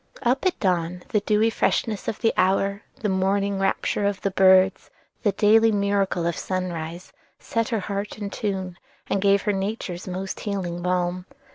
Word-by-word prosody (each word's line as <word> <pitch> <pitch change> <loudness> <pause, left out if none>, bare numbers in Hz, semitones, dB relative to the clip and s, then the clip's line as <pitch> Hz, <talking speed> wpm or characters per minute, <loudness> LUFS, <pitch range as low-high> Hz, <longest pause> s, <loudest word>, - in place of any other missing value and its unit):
Up 260 +7 +2
at 365 - -1
dawn, 180 -2 0
the 210 - +2
dewy 215 +2 +2
freshness 215 -2 0
of - - -2
the 225 - +3
hour, 195 +2 +1 0.2
the 215 - 0
morning 195 +1 +1
rapture 195 +1 0
of 200 -1 -2
the 195 - -1
birds, 190 0 +4 0.3
the 205 - +2
daily 220 +2 +5
miracle 200 -4 0
of 170 -1 0
sunrise, 175 -2 -4 0.2
set 230 -1 -2
her 225 -3 -1
heart 200 +2 -4
in 205 -2 -5
tune, 190 -4 -3 0.3
and 195 - +1
gave 200 0 +3
her 210 - +1
Nature's 195 -2 -4
most 185 +1 -4
healing 180 -4 -3
balm. 180 0 -1
195 Hz, 165 wpm, -24 LUFS, 185-205 Hz, 0.3 s, daily